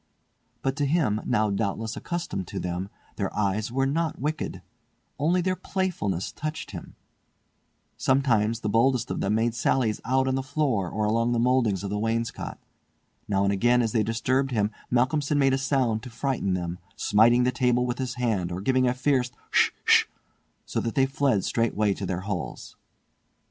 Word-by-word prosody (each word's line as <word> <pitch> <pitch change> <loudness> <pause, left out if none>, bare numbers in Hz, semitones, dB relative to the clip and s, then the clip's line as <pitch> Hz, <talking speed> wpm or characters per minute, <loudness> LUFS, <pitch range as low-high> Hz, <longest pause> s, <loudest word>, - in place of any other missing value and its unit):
But 135 0 0
to 145 - +1
him, 135 -9 +1
now 105 -1 +1
doubtless 110 +2 -2
accustomed 170 - -4
to - - -5
them, 90 +2 -3 0.3
their - - -1
eyes 105 +2 0
were 135 +2 +1
not 160 +3 -1
wicked; 145 - -3 0.6
only 170 +5 +2
their 185 +1 0
playfulness 170 - -2
touched 155 0 -5
him. - - -9 1.0
Sometimes 115 -4 +2
the - - -2
boldest 120 +2 +2
of - - -2
them 100 +2 +1
made 115 +1 +1
sallies 115 -1 +1
out 130 +2 +1
on 130 - +1
the 135 - 0
floor 130 - 0
or 105 +3 -1
along 115 +3 +1
the 120 - +1
mouldings 120 -6 +2
of 100 - -4
the 105 - -1
wainscot. 115 +1 -2 0.7
Now 100 -2 +1
and 100 0 +2
again 120 +4 +3
as 115 - -1
they 110 - +2
disturbed 130 +5 0
him 105 -4 0 0.2
Malcolmson 140 +4 +1
made 135 -2 +4
a - - +3
sound 130 -5 +1
to 125 - -9
frighten 120 -6 -1
them, 90 0 -4 0.2
smiting 120 +4 +4
the 125 - +2
table 125 -1 +2
with 125 0 -3
his 130 -1 -3
hand 110 -8 -1
or 90 - -3
giving 130 +5 +2
a 125 - +1
fierce 130 -1 +1 0.2
"Hsh, - - +5 0.2
hsh," - - +6 0.6
so - - -2
that 115 - -3
they 135 - +4
fled 135 -7 +1
straightway 110 -3 +1
to 95 - -5
their 90 0 -2
holes. 95 -4 -5
120 Hz, 180 wpm, -26 LUFS, 105-135 Hz, 1.0 s, hsh